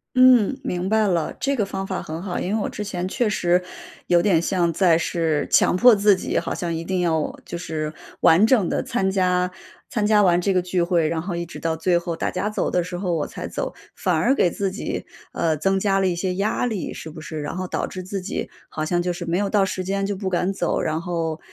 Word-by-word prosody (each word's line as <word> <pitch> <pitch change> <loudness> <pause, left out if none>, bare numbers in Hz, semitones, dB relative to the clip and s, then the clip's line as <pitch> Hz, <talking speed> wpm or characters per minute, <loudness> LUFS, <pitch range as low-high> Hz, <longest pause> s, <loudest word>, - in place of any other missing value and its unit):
嗯， 255 0 +5
明 180 +1 -2
白 220 -1 +3
了， 170 -4 0
这 280 0 0
个 215 -6 0
方 195 0 -4
法 190 - -3
很 160 +2 -6
好， 185 -2 -4
因 190 - -2
为 220 - +1
我 - - -1
之 210 - -5
前 185 -3 -3
确 230 +3 0
实， 180 -2 +2 0.4
有 175 -1 +4
点 175 -4 +3
像 170 -2 +1
在 170 -3 +4
是 160 -3 0
强 - - +4
迫 245 +2 +7
自 205 -1 +4
己 - - -2
好 - - -1
像 170 -2 -3
一 165 - -4
定 185 +1 -1
要 160 -3 0
就 170 - -5
是 155 -2 -4 0.3
完 175 +7 +6
整 225 -7 +3
的 - - -1
参 190 0 0
加 180 -1 +1 0.4
参 210 -2 -1
加 210 0 +5
完 175 -2 +4
这 195 +2 +1
个 185 - +3
聚 180 -1 0
会， 170 -3 +2
然 160 0 -1
后 180 0 -4
一 170 - -3
直 170 - -10
到 165 -1 -1
最 175 +2 +2
后 170 -1 -3
大 - - -1
家 190 +3 -2
走 215 - -1
的 180 -1 +1
时 175 0 -5
候 180 -2 -1
我 150 - -1
才 - - -6
走。 - - -4 0.2
反 - - 0
而 270 - +3
给 175 - +3
自 195 +2 -1
己， 190 - -4 0.3
呃， 160 -2 0
增 195 +6 +1
加 195 0 +2
了 - - +2
一 180 - +1
些 180 +1 -2
压 210 +5 0
力， 220 -6 -3
是 160 - -8
不 160 0 -10
是？ 155 0 -6
然 145 - -4
后 185 0 -3
导 - - -2
致 185 - -7
自 195 +2 -4
己 185 - -4 0.2
好 155 - -4
像 175 +2 0
就 180 0 -1
是 175 0 -6
没 170 +1 -1
有 200 0 0
到 205 -2 +3
时 190 -1 -2
间 195 +1 -1
就 205 - -1
不 190 -1 -2
敢 180 +1 0
走。 185 -3 -1
然 155 0 -1
后， 165 -3 -2
180 Hz, 275 characters per minute, -23 LUFS, 170-195 Hz, 0.4 s, 迫